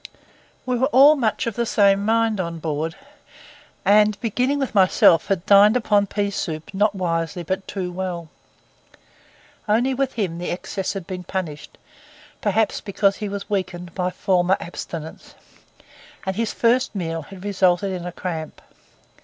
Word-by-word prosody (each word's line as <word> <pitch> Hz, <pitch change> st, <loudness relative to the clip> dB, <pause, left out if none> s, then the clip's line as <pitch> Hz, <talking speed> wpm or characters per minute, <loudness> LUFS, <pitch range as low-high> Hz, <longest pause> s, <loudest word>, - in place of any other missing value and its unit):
We 250 Hz, -1 st, 0 dB
were 260 Hz, -, +3 dB
all 285 Hz, +2 st, +7 dB
much 230 Hz, -7 st, 0 dB
of 230 Hz, -3 st, -3 dB
the 235 Hz, -, 0 dB
same 200 Hz, -2 st, +3 dB
mind 225 Hz, -1 st, +1 dB
on 170 Hz, -2 st, -3 dB
board, 160 Hz, 0 st, -3 dB, 0.9 s
and 210 Hz, +1 st, +4 dB
beginning 250 Hz, +6 st, 0 dB
with 270 Hz, -4 st, -2 dB
myself, 185 Hz, -4 st, +5 dB
had 190 Hz, -3 st, -1 dB
dined 205 Hz, +3 st, +6 dB
upon 205 Hz, -4 st, +2 dB
pea 200 Hz, 0 st, -1 dB
soup 160 Hz, -3 st, -5 dB
not 205 Hz, +1 st, +1 dB
wisely 170 Hz, -2 st, -2 dB
but 190 Hz, +3 st, -3 dB
too 185 Hz, -3 st, -4 dB
well; 175 Hz, -2 st, -4 dB, 1.4 s
only 240 Hz, +5 st, +2 dB
with 265 Hz, 0 st, -1 dB
him 185 Hz, -7 st, -2 dB
the 175 Hz, -, -4 dB
excess 190 Hz, +2 st, -3 dB
had 195 Hz, -4 st, -6 dB
been 180 Hz, -1 st, -6 dB
punished, 170 Hz, -5 st, -5 dB, 0.6 s
perhaps 215 Hz, +1 st, +1 dB
because 200 Hz, -1 st, +1 dB
he 210 Hz, -, -4 dB
was 200 Hz, 0 st, -5 dB
weakened 180 Hz, -3 st, -3 dB
by 180 Hz, -1 st, -1 dB
former 185 Hz, 0 st, +1 dB
abstinence, 165 Hz, -2 st, -8 dB, 0.9 s
and 190 Hz, 0 st, -2 dB
his 225 Hz, +1 st, -1 dB
first 240 Hz, 0 st, +1 dB
meal 165 Hz, -3 st, -3 dB
had 190 Hz, +4 st, -12 dB
resulted 190 Hz, -1 st, +2 dB
in 180 Hz, -2 st, -4 dB
a -, -, -5 dB
cramp. 165 Hz, -3 st, -5 dB
195 Hz, 155 wpm, -22 LUFS, 175-215 Hz, 1.4 s, all